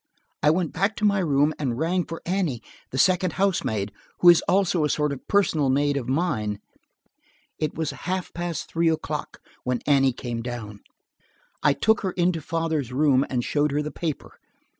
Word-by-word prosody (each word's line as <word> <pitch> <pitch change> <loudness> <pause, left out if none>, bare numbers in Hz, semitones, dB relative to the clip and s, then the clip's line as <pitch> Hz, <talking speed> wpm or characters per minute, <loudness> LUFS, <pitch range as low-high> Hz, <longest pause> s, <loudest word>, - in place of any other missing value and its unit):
I 150 - +4
went 165 +1 +1
back 195 +5 0
to 215 - -1
my 200 -1 +3
room 150 -3 +2
and 125 -5 -1
rang 175 +4 0
for 165 - -8
Annie, 175 - -1 0.3
the 130 - -5
second 185 +2 +3
housemaid, 110 - 0 0.3
who 175 - +7
is 170 - +7
also 185 -4 +2
a 150 - +1
sort 150 +1 0
of 135 - -10
personal 165 -8 +2
maid 145 +2 +2
of 130 -3 -3
mine. 115 - -1 1.0
It 155 -2 -2
was 160 -2 -2
half 185 +1 -4
past 175 -1 -4
three 165 0 +1
o'clock 160 - -3 0.2
when 125 -1 -1
Annie 135 -2 +4
came 120 -2 -5
down. 115 -4 -6 0.8
I 145 - +4
took 220 +8 +2
her 190 -2 -2
into 175 -2 +1
father's 160 -4 -2
room 135 0 +3
and 125 -2 -1
showed 150 +2 +1
her 150 +1 0
the 150 - -5
paper. 160 -4 -5
150 Hz, 180 wpm, -25 LUFS, 135-175 Hz, 1.0 s, who